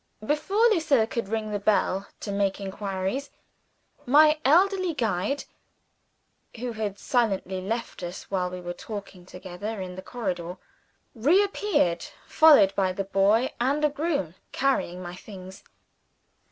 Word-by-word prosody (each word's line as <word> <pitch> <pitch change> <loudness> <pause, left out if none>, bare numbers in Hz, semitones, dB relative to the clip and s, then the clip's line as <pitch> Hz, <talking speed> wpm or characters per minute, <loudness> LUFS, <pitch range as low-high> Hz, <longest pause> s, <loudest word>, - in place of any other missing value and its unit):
Before 390 - +2
Lucilla 305 - +3
could 230 -3 -4
ring 220 -1 -2
the 205 - -1
bell 200 -1 +1
to 205 - -4
make 200 -1 0
inquiries, 195 +6 -3 0.8
my 305 +3 +6
elderly 365 +3 +3
guide 220 +3 -1 1.1
(who 245 +1 -4
had 215 -3 -4
silently 195 -6 0
left 225 +3 -4
us 175 0 -6
while 180 -2 0
we 180 0 -7
were 175 0 -5
talking 195 -2 -9
together 190 +4 -6
in 185 -1 -5
the 185 - -7
corridor) 185 -6 -4 0.6
re 300 - +4
appeared, 395 - 0 0.2
followed 285 -12 +6
by 190 -1 +1
the 195 - -2
boy 200 +5 +2
and 280 +5 +1
a - - +3
groom, 290 - -2 0.2
carrying 185 -9 0
my 175 0 -7
things. 190 -1 -11
210 Hz, 135 wpm, -26 LUFS, 185-275 Hz, 1.1 s, my